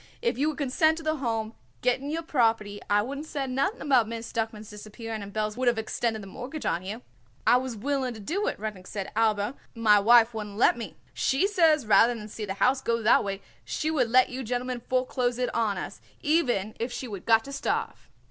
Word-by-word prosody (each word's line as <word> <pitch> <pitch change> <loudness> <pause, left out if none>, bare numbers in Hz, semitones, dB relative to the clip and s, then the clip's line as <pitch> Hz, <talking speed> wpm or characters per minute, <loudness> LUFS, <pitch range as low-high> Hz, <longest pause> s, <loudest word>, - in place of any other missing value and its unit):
"If 470 -1 0
you 290 +3 +1
would 300 - -5
consent 315 +3 +2
to 325 - -7
the 310 0 0
Home 225 -4 -2 0.3
getting 255 +3 +1
your 325 +2 -2
property 225 -8 +1
I 205 0 +3
wouldn't 280 +6 -6
said 270 -4 -3
nothing 275 - 0
about 255 -6 +3
Miss 230 +1 -6
Duckman's 220 -1 -3
disappearing 215 +1 -7
and 200 0 -8
Belz 215 0 -2
would 255 0 0
of 240 -1 +3
extended 220 0 -2
the - - -9
mortgage 255 +10 -7
on 175 - 0
you." 210 +6 -6 0.4
"I 245 - +6
was 255 -2 -3
willing 260 +2 -2
to - - -9
do 375 - -2
it," - - -2
Rudnik 205 -4 -6
said, 195 -2 -5
"aber 215 0 +1 0.2
my 215 -3 +5
wife 230 +2 +6
wouldn't 210 -2 -6
let 240 - +5
me. 235 - -7 0.2
She 270 +8 +1
says 325 - +3
rather 230 +3 +5
than 215 -1 -8
see 215 0 -5
the 195 -1 -4
house 255 +5 +2
go 230 -2 -1
that 220 - +5
way 195 -1 -4 0.2
she 310 - -2
would 255 -7 +1
let 255 +2 +5
you 260 +1 -5
gentlemen 250 +1 -3
foreclose 255 -1 0
it 250 0 -1
on 220 -4 0
us, - - -6 0.2
even 245 - +1
if 235 +2 -2
she 255 - -5
would 200 -5 -8
got 225 -1 +5
to 275 - -9
starve." 275 - -3
235 Hz, 220 wpm, -27 LUFS, 215-270 Hz, 0.4 s, I